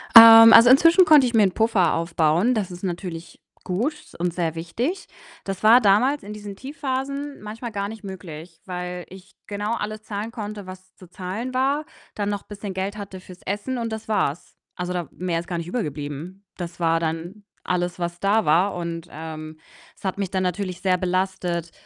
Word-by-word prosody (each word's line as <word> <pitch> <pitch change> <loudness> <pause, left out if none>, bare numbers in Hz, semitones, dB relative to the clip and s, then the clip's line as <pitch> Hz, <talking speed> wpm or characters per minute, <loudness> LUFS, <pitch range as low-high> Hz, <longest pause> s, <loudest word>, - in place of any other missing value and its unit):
Ähm, 225 0 +11
also, 230 +1 +9
inzwischen 330 +7 +7
konnte 305 -4 +7
ich 240 - -4
mir 220 -2 +5
'n 190 - +3
Puffer 200 -5 +2
aufbauen. 165 +6 +2
Das 205 -6 -2
ist 180 +1 -10
natürlich 175 -2 -6 0.2
gut 215 - -1 0.3
und 175 0 -1
sehr 165 -2 -2
wichtig. 240 - -3 0.4
Das 195 +1 -5
war 230 +3 +8
damals 250 +8 +3
in 210 - -7
diesen 205 -1 -8
Tiefphasen 275 +1 -4
manchmal 225 +3 -7
gar 200 -1 -3
nicht 220 +1 -9
möglich, 170 -4 -9
weil 180 -1 -5
ich 190 +1 -14
genau 205 +2 -3
alles 215 -1 -5
zahlen 215 +1 -5
konnte, 210 -4 -7
was 185 0 -12
zu 185 - -16
zahlen 195 +8 -5
war, 275 +4 +1 0.3
dann 205 -1 -3
noch 205 -1 -3
bisschen 205 -1 -7
Geld 190 +2 -3
hatte 200 -2 -8
fürs 185 -1 -14
Essen, 205 +6 -3
und 230 -1 -3
das 220 0 -6
war's. 175 -8 -1 0.2
Also, 180 0 -4
da 175 -2 -3
mehr 175 -2 -2
ist 170 - -8
gar 175 - -3
nicht 170 0 -5
übrig 225 +5 -2
geblieben. 150 +6 -7
Das 175 -1 -7
war 165 -1 +2
dann 165 +5 -4 0.2
alles, 175 -1 -1
was 175 -1 -4
da 205 +4 +2
war, 175 +6 +3
und, 170 -1 -5
ähm, 155 0 -8 0.4
es - - -24
hat 190 -1 -2
mich 200 -2 -2
dann 190 0 -1
natürlich 185 0 -3
sehr 185 -1 +2
belastet, 180 -2 -2
190 Hz, 190 wpm, -23 LUFS, 175-220 Hz, 0.4 s, Ähm